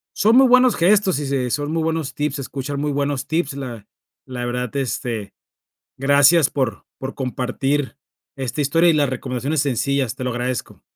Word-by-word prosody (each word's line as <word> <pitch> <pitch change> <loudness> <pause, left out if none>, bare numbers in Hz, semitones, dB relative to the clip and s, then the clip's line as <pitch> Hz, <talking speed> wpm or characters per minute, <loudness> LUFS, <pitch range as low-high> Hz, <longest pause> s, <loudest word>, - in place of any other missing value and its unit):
Son 220 +3 +4
muy 265 +1 +7
buenos 255 0 +5
gestos, 190 -1 +3
y 145 - -3
se 135 -2 -1
son 145 +3 -1
muy 165 0 0
buenos 160 -3 -2
tips, 150 +1 -2
se 140 - -4
escuchan 140 +1 -5
muy 150 0 -1
buenos 140 -1 -2
tips. 160 -3 -1
La 125 -6 -7 0.4
la 125 -2 -5
verdad, 125 -1 -3
este, 120 -6 -3 0.6
gracias 140 +3 +5
por 130 -7 -2
por 130 0 -6
compartir 135 +2 -2 0.4
esta 135 +2 -3
historia 165 +5 +3
y - - +4
las 150 -3 +2
recomendaciones 130 +3 -2
sencillas, 140 -2 0
te 130 - -5
lo 125 - -1
agradezco. 125 0 -4
140 Hz, 175 wpm, -21 LUFS, 125-150 Hz, 0.6 s, muy